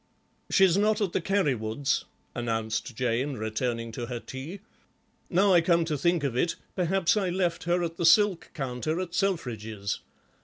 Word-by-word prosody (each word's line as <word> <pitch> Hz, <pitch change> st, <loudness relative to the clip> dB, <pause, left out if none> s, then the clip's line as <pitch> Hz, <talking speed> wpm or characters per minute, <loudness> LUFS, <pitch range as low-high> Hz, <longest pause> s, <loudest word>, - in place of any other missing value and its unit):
"She's 190 Hz, -1 st, +5 dB
not 215 Hz, +1 st, +2 dB
at 200 Hz, -5 st, -1 dB
the -, -, +1 dB
Carrywoods'," 140 Hz, -, 0 dB, 0.3 s
announced 115 Hz, 0 st, -2 dB
Jane, 125 Hz, +3 st, 0 dB
returning 115 Hz, +1 st, -2 dB
to 120 Hz, 0 st, -5 dB
her 120 Hz, -2 st, -4 dB
tea; 145 Hz, +11 st, -8 dB, 0.7 s
"now 190 Hz, +2 st, +4 dB
I 175 Hz, -, +6 dB
come 170 Hz, 0 st, +3 dB
to 155 Hz, -2 st, -1 dB
think 170 Hz, +2 st, +1 dB
of 135 Hz, -4 st, -1 dB
it, 165 Hz, +7 st, +1 dB, 0.2 s
perhaps 185 Hz, +2 st, +2 dB
I 195 Hz, -3 st, +1 dB
left 175 Hz, -2 st, -1 dB
her 175 Hz, +1 st, +1 dB
at 165 Hz, 0 st, -4 dB
the 170 Hz, -, 0 dB
silk 190 Hz, +1 st, +4 dB
counter 135 Hz, +4 st, -2 dB
at 180 Hz, -2 st, -4 dB
Selfridge's. 110 Hz, -, -2 dB
165 Hz, 160 wpm, -27 LUFS, 120-185 Hz, 0.7 s, I